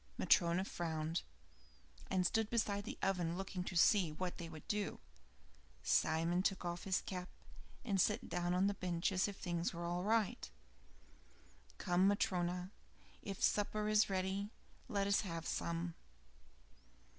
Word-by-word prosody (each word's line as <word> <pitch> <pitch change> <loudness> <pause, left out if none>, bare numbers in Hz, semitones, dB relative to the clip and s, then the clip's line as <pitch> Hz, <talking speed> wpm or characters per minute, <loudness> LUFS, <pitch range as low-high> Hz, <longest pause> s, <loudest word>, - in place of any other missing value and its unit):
Matryona 175 +2 +4
frowned, 160 -2 -2 0.9
and 185 -1 +2
stood 220 +3 +2
beside 205 -3 0
the - - -5
oven 180 -3 0
looking 190 -1 -3
to 185 - -5
see 180 -1 +5
what 180 +4 -4
they 170 -1 -5
would 155 -2 -10
do. 210 -1 -1 0.8
Simon 165 +3 +2
took 190 -1 0
off 175 0 -3
his 190 -2 +1
cap 180 -1 -5 0.6
and 195 -5 +2
sat 215 +7 +1
down 175 +1 0
on 185 +2 +3
the 200 - +2
bench 180 0 -1
as 190 0 +2
if 200 -1 -6
things 170 -1 -2
were 170 0 -4
all 175 +1 -1
right. 215 - +1 1.3
"Come, 180 +2 +3
Matryona; 180 -2 0 0.5
if 195 -1 -5
supper 210 +1 +2
is 215 0 +4
ready, 190 +1 -1 0.4
let 200 -4 +1
us 200 0 +3
have 165 -4 -5
some." 170 0 -2
185 Hz, 145 wpm, -37 LUFS, 175-200 Hz, 1.3 s, see